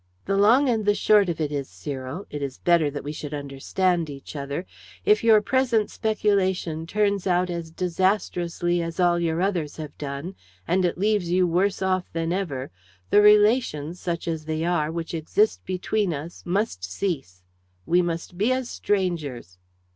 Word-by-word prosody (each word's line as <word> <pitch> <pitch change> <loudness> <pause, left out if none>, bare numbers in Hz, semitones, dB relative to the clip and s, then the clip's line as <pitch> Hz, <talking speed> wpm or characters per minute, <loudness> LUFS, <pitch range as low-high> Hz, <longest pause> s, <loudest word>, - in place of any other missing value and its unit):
"The 195 - 0
long 230 +8 +5
and 225 -3 +1
the 205 0 +3
short 205 -3 +4
of 165 - -3
it 150 -2 -1
is, 140 -2 -3
Cyril 130 - -6
it 145 - -5
is 135 -2 -4
better 170 -4 +3
that 145 0 -6
we 145 - -4
should 150 -1 -6
understand 155 +5 -1
each 140 +1 -9
other! 140 0 -4 0.4
if 210 +1 +4
your 220 -2 +6
present 245 -4 +1
speculation 190 -7 0
turns 200 0 0
out 180 0 +2
as 170 -1 -4
disastrously 175 -1 0
as 165 +1 -5
all 175 -1 +3
your 170 +1 0
others 175 -7 -1
have 155 -2 -7
done, 145 +5 -5 0.3
and 185 +1 +2
it 175 - -1
leaves 205 -2 +1
you 180 +1 +3
worse 190 +3 +1
off 185 -1 0
than 165 +1 -1
ever, 145 -9 -3 0.4
the 205 - +7
relations, 210 - +4
such 170 -1 -3
as 160 -2 -3
they 160 +1 -2
are, 160 -3 +1
which 165 0 -5
exist 170 +7 +1
between 185 0 -1
us 155 +5 -8
must 185 - -1
cease. 90 - -4 0.4
We 175 +2 +3
must 175 +1 -4
be 220 +5 +3
as 255 -1 -1
strangers!" 155 - -2
175 Hz, 170 wpm, -24 LUFS, 155-200 Hz, 0.4 s, the